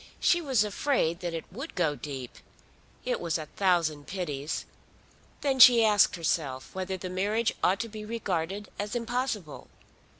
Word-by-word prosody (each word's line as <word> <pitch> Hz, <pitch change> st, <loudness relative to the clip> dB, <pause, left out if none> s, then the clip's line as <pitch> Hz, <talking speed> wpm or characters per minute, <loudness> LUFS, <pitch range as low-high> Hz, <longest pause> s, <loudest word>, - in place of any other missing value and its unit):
She 345 Hz, -, +3 dB
was 265 Hz, -9 st, +2 dB
afraid 205 Hz, -, 0 dB
that 175 Hz, -2 st, -4 dB
it 165 Hz, -, -5 dB
would 265 Hz, -, -7 dB
go 160 Hz, -4 st, +1 dB
deep. 135 Hz, -4 st, -7 dB, 0.7 s
It -, -, 0 dB
was 170 Hz, -1 st, -1 dB
a 155 Hz, -, -6 dB
thousand 160 Hz, -5 st, 0 dB
pities! 155 Hz, -6 st, -4 dB, 0.8 s
Then 270 Hz, -2 st, 0 dB
she 240 Hz, -3 st, +9 dB
asked 210 Hz, -3 st, +4 dB
herself 150 Hz, -6 st, -2 dB
whether 190 Hz, 0 st, -3 dB
the 185 Hz, -, -6 dB
marriage 205 Hz, +5 st, 0 dB
ought 190 Hz, +2 st, +3 dB
to 230 Hz, -, -4 dB
be 215 Hz, -1 st, -8 dB
regarded 200 Hz, -3 st, -3 dB
as 205 Hz, +3 st, -3 dB
impossible. 235 Hz, -, -3 dB
190 Hz, 155 wpm, -28 LUFS, 165-225 Hz, 0.8 s, she